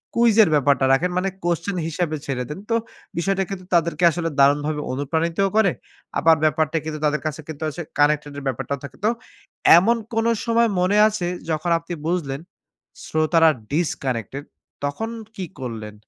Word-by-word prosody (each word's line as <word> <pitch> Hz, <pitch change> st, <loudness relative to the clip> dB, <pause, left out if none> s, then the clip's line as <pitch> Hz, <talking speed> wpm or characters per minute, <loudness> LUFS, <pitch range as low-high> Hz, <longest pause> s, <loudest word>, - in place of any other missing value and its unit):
Quiz 235 Hz, -2 st, +4 dB
এর 165 Hz, -, +2 dB
ব্যাপারটা 140 Hz, -2 st, +3 dB
রাখেন 180 Hz, +7 st, +1 dB
মানে 195 Hz, +1 st, +1 dB, 0.2 s
Question 175 Hz, +3 st, -1 dB
হিসাবে 160 Hz, -1 st, -2 dB
ছেড়ে 130 Hz, -2 st, -2 dB
দেন। 150 Hz, -, -6 dB
তো 230 Hz, -, +2 dB, 0.4 s
বিষয়টা 195 Hz, +2 st, +1 dB
কিন্তু 185 Hz, -2 st, -6 dB
তাদেরকে 170 Hz, +1 st, +1 dB
আসলে 165 Hz, 0 st, -2 dB
দারুণভাবে 145 Hz, +2 st, +3 dB
অনুপ্রাণিতও 165 Hz, +7 st, 0 dB
করে। 195 Hz, -5 st, +4 dB, 0.5 s
আবার 165 Hz, 0 st, +5 dB
ব্যাপারটা 155 Hz, +1 st, +1 dB
কিন্তু 155 Hz, -1 st, -4 dB
তাদের 150 Hz, 0 st, +1 dB
কাছে 155 Hz, +1 st, -3 dB
কিন্তু 155 Hz, -1 st, -7 dB
আসে 175 Hz, +4 st, -6 dB, 0.2 s
কানেক্টেড 145 Hz, 0 st, +2 dB
এর 140 Hz, -, -6 dB
ব্যাপারটাও 135 Hz, +2 st, -3 dB
থাকে। 140 Hz, -, -9 dB
তো -, -, +5 dB, 0.7 s
এমন 225 Hz, +7 st, +4 dB, 0.2 s
কোন 225 Hz, 0 st, +1 dB, 0.2 s
সময় 230 Hz, 0 st, +3 dB
মনে 195 Hz, +3 st, +2 dB
আছে 205 Hz, -5 st, -2 dB, 0.2 s
যখন 160 Hz, +2 st, -1 dB
আপনি 170 Hz, +1 st, -7 dB
বুঝলেন 150 Hz, -6 st, -1 dB, 0.6 s
শ্রোতারা 160 Hz, +1 st, +3 dB, 0.2 s
Disconnected 135 Hz, -, -2 dB, 0.4 s
তখন 220 Hz, +11 st, -4 dB, 0.3 s
কি 190 Hz, -, -4 dB
করলেন? 110 Hz, -4 st, -6 dB
160 Hz, 155 wpm, -22 LUFS, 145-180 Hz, 0.7 s, আবার